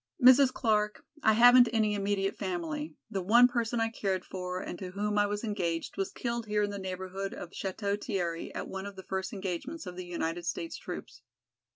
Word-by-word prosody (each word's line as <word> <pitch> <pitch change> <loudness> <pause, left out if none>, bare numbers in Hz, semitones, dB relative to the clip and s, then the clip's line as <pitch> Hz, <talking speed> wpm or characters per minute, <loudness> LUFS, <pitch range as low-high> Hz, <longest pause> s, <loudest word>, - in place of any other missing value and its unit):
"Mrs. 260 +1 +7
Clark, 210 -4 0 0.2
I 220 - +5
haven't 245 +2 +8
any 220 -2 +2
immediate 200 -1 0
family, 165 -5 -3 0.2
the 195 - -1
one 235 +7 +7
person 235 -1 -1
I 225 0 +2
cared 195 -5 -2
for 180 -1 -4
and 175 - -6
to 185 - -5
whom 205 +2 -1
I 205 - +4
was 205 +1 -3
engaged 180 -7 -2
was 195 - -2
killed 235 -2 -3
here 210 0 +1
in 205 - -1
the 200 - -5
neighborhood 190 +1 -4
of 170 - -8
Château 200 +2 -3
Thierry 175 -6 -2
at - - -4
one 190 +1 -5
of 200 - -9
the 190 - -9
first 190 0 -2
engagements 200 - -4
of 180 -1 -7
the 185 0 -6
United 170 0 -3
States 165 -1 -3
troops. 125 -8 -8
195 Hz, 200 wpm, -30 LUFS, 180-220 Hz, 0.2 s, haven't